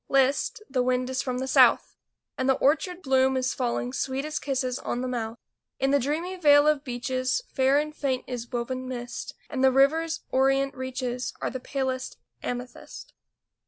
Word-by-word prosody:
List, 275 Hz, -, +2 dB
the 260 Hz, -2 st, 0 dB
wind 250 Hz, 0 st, 0 dB
is 260 Hz, 0 st, 0 dB
from 255 Hz, -2 st, -3 dB
the 260 Hz, +1 st, -3 dB
south! -, -, +4 dB, 0.4 s
And 260 Hz, +1 st, -1 dB
the 265 Hz, -, +5 dB
orchard 350 Hz, +7 st, +1 dB
bloom 265 Hz, -1 st, +3 dB
is 255 Hz, 0 st, 0 dB
falling 245 Hz, 0 st, -2 dB
Sweet 270 Hz, +1 st, -2 dB
as 305 Hz, 0 st, -3 dB
kisses 260 Hz, -2 st, -2 dB
on 245 Hz, -, -3 dB
the 255 Hz, -, -2 dB
mouth. 230 Hz, -2 st, -3 dB, 0.4 s
In 270 Hz, 0 st, +2 dB
the 285 Hz, -, +4 dB
dreamy 315 Hz, +8 st, -2 dB
vale 290 Hz, -3 st, +6 dB
of 300 Hz, -2 st, +2 dB
beeches 255 Hz, -, -1 dB
Fair 265 Hz, +1 st, +3 dB
and 305 Hz, +1 st, -1 dB
faint 265 Hz, -4 st, -1 dB
is 245 Hz, -1 st, -6 dB
woven 255 Hz, +1 st, -3 dB
mist, 245 Hz, -1 st, -6 dB
And 265 Hz, -3 st, -2 dB
the 265 Hz, -, +6 dB
river's 315 Hz, +5 st, +2 dB
orient 270 Hz, +1 st, +2 dB
reaches 260 Hz, -1 st, -4 dB
Are -, -, -2 dB
the 260 Hz, -, -4 dB
palest 260 Hz, 0 st, -3 dB, 0.2 s
amethyst. 245 Hz, 0 st, -7 dB
260 Hz, 175 wpm, -26 LUFS, 255-280 Hz, 0.4 s, vale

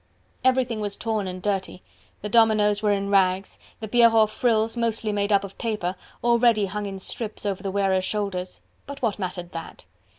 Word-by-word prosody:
Everything 255 Hz, -3 st, +2 dB
was 205 Hz, -1 st, -4 dB
torn 220 Hz, -4 st, -2 dB
and 185 Hz, 0 st, -6 dB
dirty, 195 Hz, -3 st, -2 dB, 0.4 s
the -, -, -2 dB
dominoes 210 Hz, -2 st, +3 dB
were 210 Hz, -1 st, +2 dB
in 200 Hz, 0 st, -1 dB
rags, 190 Hz, -1 st, +2 dB, 0.2 s
the 220 Hz, -, -4 dB
Pierrot 225 Hz, -1 st, +5 dB
frills, 225 Hz, -1 st, +1 dB
mostly 230 Hz, -2 st, -1 dB
made 205 Hz, 0 st, -1 dB
up 200 Hz, -1 st, +4 dB
of 200 Hz, -1 st, -10 dB
paper, 210 Hz, -6 st, -2 dB, 0.3 s
already 235 Hz, -3 st, +4 dB
hung 205 Hz, +2 st, -4 dB
in 195 Hz, -1 st, -6 dB
strips 210 Hz, +3 st, -5 dB
over 195 Hz, -2 st, -2 dB
the 195 Hz, -, -3 dB
wearers' 190 Hz, -1 st, +1 dB
shoulders. 190 Hz, -3 st, -3 dB, 0.3 s
But 280 Hz, -1 st, -8 dB
what 215 Hz, -3 st, 0 dB
mattered 180 Hz, -2 st, -5 dB
that? 165 Hz, -1 st, -8 dB
210 Hz, 175 wpm, -24 LUFS, 195-225 Hz, 0.4 s, Pierrot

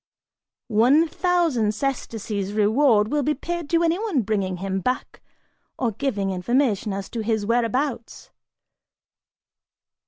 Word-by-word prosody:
One 250 Hz, +9 st, +4 dB
thousand 325 Hz, -, +1 dB
sesterces 215 Hz, -6 st, -3 dB
reward 215 Hz, +1 st, +3 dB
will 295 Hz, +2 st, +1 dB
be 300 Hz, +2 st, 0 dB
paid 340 Hz, +2 st, -5 dB
to 335 Hz, 0 st, +2 dB
anyone 340 Hz, -, +1 dB
bringing 195 Hz, -3 st, -1 dB
him 190 Hz, +1 st, -2 dB
back 250 Hz, +7 st, -3 dB, 0.6 s
or 245 Hz, -3 st, 0 dB
giving 205 Hz, -5 st, -2 dB
information 215 Hz, +2 st, 0 dB
as 195 Hz, 0 st, -4 dB
to 235 Hz, -, -4 dB
his 220 Hz, -1 st, -1 dB
whereabouts." 235 Hz, +2 st, -1 dB
235 Hz, 115 wpm, -23 LUFS, 205-290 Hz, 0.6 s, One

